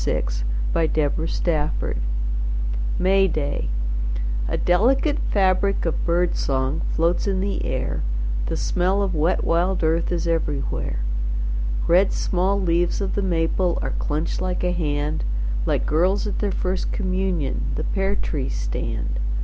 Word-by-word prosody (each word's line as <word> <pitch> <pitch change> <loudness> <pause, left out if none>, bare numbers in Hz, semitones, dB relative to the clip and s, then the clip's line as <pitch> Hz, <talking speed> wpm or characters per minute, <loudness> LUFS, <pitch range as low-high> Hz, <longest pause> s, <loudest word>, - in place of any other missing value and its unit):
VI - - +1 0.5
The 165 - +3
Dark 155 0 0
Cup - - -2 1.0
May 195 +1 +4
Day 145 - -1 0.8
A - - 0
delicate 255 - +3
fabric 195 0 +2
of 165 - -1
bird 175 +1 +2
song 135 +1 0
Floats 170 +4 +2
in 195 -1 +1
the 200 +1 -1
air, - - -1 0.5
The - - -1
smell 185 +3 +1
of 190 -2 -1
wet 160 +3 +2
wild 175 +2 +1
earth 165 +2 +2
Is 175 -1 0
everywhere. 145 - -1 0.8
Red 185 +3 +4
small 190 +2 +1
leaves 175 -2 +1
of 195 -1 -1
the 205 - 0
maple 175 0 +1
Are - - -2
clenched 155 +4 -1
like 185 -1 -1
a 180 - +2
hand, 150 - -1 0.4
Like - - +1
girls 185 +7 +2
at 210 - -2
their 205 -1 0
first 185 0 -1
communion 185 -7 -1
The - - -2
pear 195 0 0
trees 140 - -2
stand. - - -2
175 Hz, 140 wpm, -23 LUFS, 155-190 Hz, 1.0 s, May